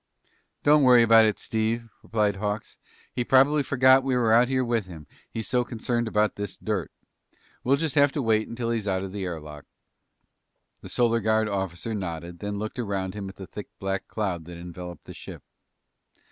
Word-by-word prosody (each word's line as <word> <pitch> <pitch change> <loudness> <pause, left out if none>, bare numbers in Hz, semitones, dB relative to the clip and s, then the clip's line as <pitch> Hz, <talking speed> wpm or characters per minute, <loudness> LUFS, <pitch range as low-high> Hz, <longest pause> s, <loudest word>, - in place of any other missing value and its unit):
"Don't 150 +1 +6
worry 125 -3 +7
about 115 -1 +7
it, 105 - 0
Steve," 115 +1 -2
replied 105 -3 0
Hawks. 105 +1 -4 0.3
"He 125 - -1
probably 135 +4 +4
forgot 130 -1 +5
we 130 -1 0
were 115 -3 +3
out 120 +2 +6
here 130 -1 0
with 115 -5 -1
him, 80 -4 -10 0.2
he's 110 -3 -5
so 125 -1 +2
concerned 120 0 -2
about 105 -1 +1
this 100 -2 -4
dirt. 100 -7 -3 0.7
We'll 135 +3 +4
just 155 -2 -1
have 145 -1 +5
to 145 - -1
wait 110 -1 +2
until 115 0 -3
he's 110 -3 -2
out 95 -1 0
of 95 - -6
the 100 -1 -4
air 85 -3 -4
lock." 75 -1 -11 1.2
The - - -9
Solar 115 -1 +2
Guard 110 0 +2
officer 95 +1 -3
nodded, 85 -3 -5
then 100 +1 -4
looked 110 +4 -5
around 100 -4 -2
him 100 -2 -6
at 95 - -12
the 95 - -9
thick 105 +2 -9
black 95 0 -3
cloud 95 -7 -3
that 85 0 -9
enveloped 90 0 -9
the - - -9
ship. - - -10
110 Hz, 190 wpm, -26 LUFS, 95-120 Hz, 1.2 s, worry